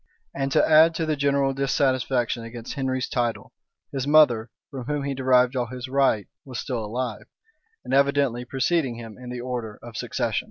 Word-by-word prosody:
And 135 0 -2
to - - +4
add 160 +1 +6
to 160 - -1
the 155 -1 0
general 140 -1 +1
dissatisfaction 130 -3 0
against 115 +1 -7
Henry's 130 -2 -1
title, 120 -2 -2 0.4
his 135 0 -3
mother, 125 -7 +5 0.2
from 130 -3 -6
whom 145 +1 -2
he 140 0 -2
derived 130 -1 +3
all 125 -2 0
his 125 +2 -7
right 130 -6 +2 0.2
was 130 -3 -6
still 125 -5 -3
alive; 115 0 -4 0.6
and - - -4
evidently 140 -3 +2
preceded 135 +1 0
him 115 -2 -9
in 125 -1 -9
the 125 -1 -5
order 120 -4 -4
of 120 -1 -10
succession. - - -1
130 Hz, 175 wpm, -25 LUFS, 120-140 Hz, 0.6 s, add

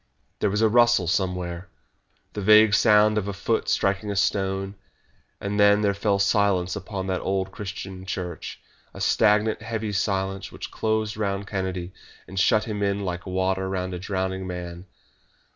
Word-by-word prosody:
There - - +1
was 105 +3 0
a - - +6
rustle 120 -3 +4
somewhere, 90 0 -2 0.6
the 105 - -4
vague 105 +1 +6
sound 105 0 +5
of 100 - -5
a 100 - -3
foot 110 +3 -1
striking 100 +2 0
a 100 - -2
stone, 95 0 0 0.7
and 100 +1 -3
then 100 0 +5
there 100 -1 +2
fell 100 0 +1
silence 100 -2 +2
upon 95 -1 -5
that 95 -1 -2
old 95 0 -1
Christian 95 -2 -7
church 90 -2 -5 0.4
a - - -8
stagnant, 110 0 +2
heavy 110 -1 -3
silence 95 -1 -1
which - - -8
closed 110 -1 -1
round 100 -2 -2
Kennedy 95 -2 -4 0.3
and 95 0 -4
shut 105 +2 +3
him 105 -2 -4
in 100 0 0
like 90 +1 -4
water 95 +1 -1
round 95 -1 -3
a 90 - -4
drowning 95 0 -3
man. 90 0 -7
100 Hz, 160 wpm, -25 LUFS, 95-105 Hz, 0.7 s, a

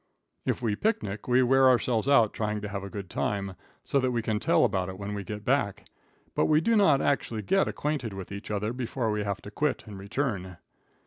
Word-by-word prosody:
If - - -1
we 110 -3 +1
picnic, 105 - -2
we 125 +1 +4
wear 135 +1 +5
ourselves 120 0 +2
out 115 -7 +5
trying 105 -1 -2
to 105 - -4
have 100 -1 -4
a 100 - -6
good 100 -1 -6
time, 100 +1 -2 0.3
so 140 - +1
that 130 -1 +1
we 120 -2 -1
can 110 -1 0
tell - - +3
about 95 -2 0
it 95 - -7
when 100 +1 -5
we 100 -1 -4
get 105 +2 -7
back, 125 -7 0 0.5
but - - +2
we 155 0 +4
do 230 +8 +2
not 160 -10 +4
actually 115 -6 0
get 195 - +2
acquainted 145 -6 -2
with 95 -1 -8
each 100 0 -7
other 105 +2 -1
before 120 -2 -2
we 105 -1 -1
have 100 -1 -3
to 100 - -9
quit 150 +6 -1
and 105 -3 -9
return. 100 -4 -3
110 Hz, 220 wpm, -28 LUFS, 100-130 Hz, 0.5 s, wear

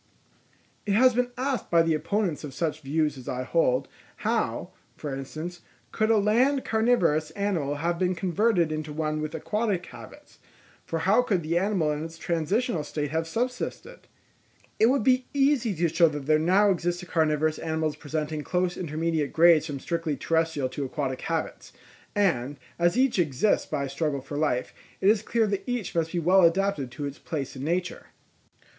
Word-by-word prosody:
_—It 200 - +2
has 255 +3 +6
been 250 +1 +1
asked 265 0 -2
by 170 -1 +5
the 165 -1 +1
opponents 180 0 -1
of 140 -3 -7
such 155 +1 -2
views 150 0 -1
as 125 - -8
I 125 0 -2
hold, 130 -3 +1 0.4
how, - - -1 0.2
for 145 -2 -5
instance, 155 +6 -6 0.3
could 215 0 0
a 225 - +5
land 245 +7 +2
carnivorous 200 -10 +2
animal 180 -9 -1
have 170 +3 -1
been 185 0 +1
converted 180 0 +1
into 155 -1 -4
one 155 0 -2
with 155 +1 -4
aquatic 205 +2 -1
habits; - - -13 0.4
for 165 - -3
how 205 +6 +5
could 195 -8 0
the 160 +2 -1
animal 185 -6 +1
in 150 +1 -3
its 165 0 -8
transitional 170 +4 -1
state 145 -1 -4
have 160 +1 -1
subsisted? 250 - -4 0.7
It 220 - +6
would 260 -2 +2
be 255 +1 +3
easy 270 -7 +2
to 170 +1 +1
show 165 +1 +4
that 145 -2 -6
there 155 +1 +3
now 190 +5 +4
exist 175 0 -2
carnivorous 155 -1 +1
animals 160 -1 -1
presenting 155 0 -4
close 180 +1 -1
intermediate 160 -2 -1
grades 165 -1 +5
from 145 -3 -5
strictly 165 -1 -2
terrestrial 160 -3 0
to 140 +2 -4
aquatic 135 -1 -3
habits; 165 -1 -4 0.4
and 145 -9 +1 0.2
as 175 +6 +2
each 255 -6 +2
exists 155 +4 +1
by 145 -2 -2
a 140 - -4
struggle 140 0 -2
for 140 +2 -8
life, 145 -5 0 0.3
it 195 - +4
is 210 -1 +4
clear 225 0 +1
that 200 -2 -1
each 245 -5 -3
must 165 -1 0
be 180 - -3
well 180 +3 +4
adapted 170 -5 +2
to 135 +4 -6
its 140 +1 -6
place 145 -6 -5
in 130 - -6
nature. 175 +4 -2
165 Hz, 175 wpm, -26 LUFS, 150-200 Hz, 0.7 s, has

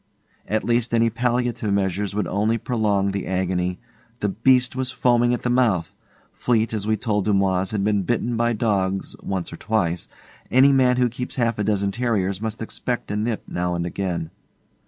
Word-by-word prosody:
At 110 +1 0
least 120 0 +1
any 115 0 +3
palliative 120 -2 0
measures 100 0 0
would 105 - 0
only 110 +3 +1
prolong 105 -5 0
the 100 -1 -3
agony. 90 -1 -1 0.4
The 105 - +1
beast 125 +5 +3
was 130 -1 -1
foaming 120 -1 +2
at 120 - -1
the 125 - 0
mouth. 110 -10 +2 0.4
Fleete, 115 -2 +1
as 105 -1 -2
we 110 0 +2
told 105 -5 -1
Dumoise, 95 -2 +2
had 105 -2 -1
been 105 -1 +2
bitten 120 +4 -1
by 120 +1 +1
dogs 95 -4 -1
once 95 -3 -3
or - - -7
twice. 90 -6 -1 0.4
Any 135 +3 +6
man 125 -2 +4
who 125 -1 +3
keeps 125 +1 -5
half 115 -3 0
a - - +1
dozen 100 -1 +1
terriers 100 -4 -1
must 110 0 -3
expect 120 0 -3
a - - -1
nip 110 +1 -1
now 90 0 -2
and 85 0 -2
again. 85 -3 -3
110 Hz, 180 wpm, -23 LUFS, 95-120 Hz, 0.4 s, Any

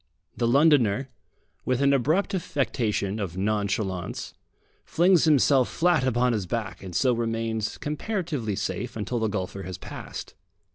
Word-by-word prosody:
The 120 - 0
Londoner, 135 -3 +4 0.5
with 130 -1 0
an 140 0 +4
abrupt 155 - +1
affectation 115 - -1
of 95 -4 -4
nonchalance, 100 -2 -2 0.5
flings 175 0 +3
himself 140 -4 +4
flat 170 -4 +2
upon 125 0 +2
his 105 -5 -2
back, 110 0 -3
and 95 -3 -8
so 130 +5 +3
remains 115 -1 -2
comparatively 150 - -3
safe - - -3
until 115 +3 -2
the 110 - +1
golfer 100 -1 -4
has 95 -1 -6
passed. - - -8
120 Hz, 135 wpm, -26 LUFS, 105-145 Hz, 0.5 s, Londoner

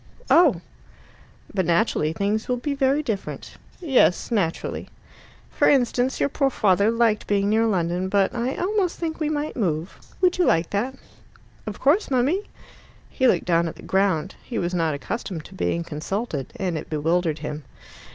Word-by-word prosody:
"Oh!" 295 - +5 0.9
"But 190 -4 0
naturally 170 -3 +2
things 200 +6 -1
will 250 - +1
be 285 +4 -2
very 275 +2 +1
different." 215 -7 -5 0.2
"Yes, 265 - +2
naturally." 185 -8 -1 0.6
"For - - +3
instance, 255 -1 +2
your - - +3
poor 275 -1 +1
father 200 -4 +3
liked 230 -2 +1
being 200 0 +1
near 225 +1 +3
London, 180 -2 0
but 195 -1 +2
I 245 +2 -2
almost 380 -2 0
think 325 -1 -4
we 305 -2 0
might 300 0 -2
move. 170 - -2 0.2
Would 365 -1 +2
you 355 - +4
like 165 0 +2
that?" 240 +7 -1 0.7
"Of 210 - -5
course, 310 +10 +3
mummy." 280 - +1 0.6
He 260 - +2
looked - - +2
down 170 -1 +2
at 165 - -6
the - - -14
ground. 190 -2 +1
He 235 - -5
was 175 +1 -1
not 165 -4 +1
accustomed 180 0 -5
to - - -13
being 170 -2 -1
consulted, 155 - -4
and 180 -5 -2
it - - -10
bewildered 160 +1 0
him. 150 0 -5
205 Hz, 165 wpm, -24 LUFS, 170-265 Hz, 0.9 s, Oh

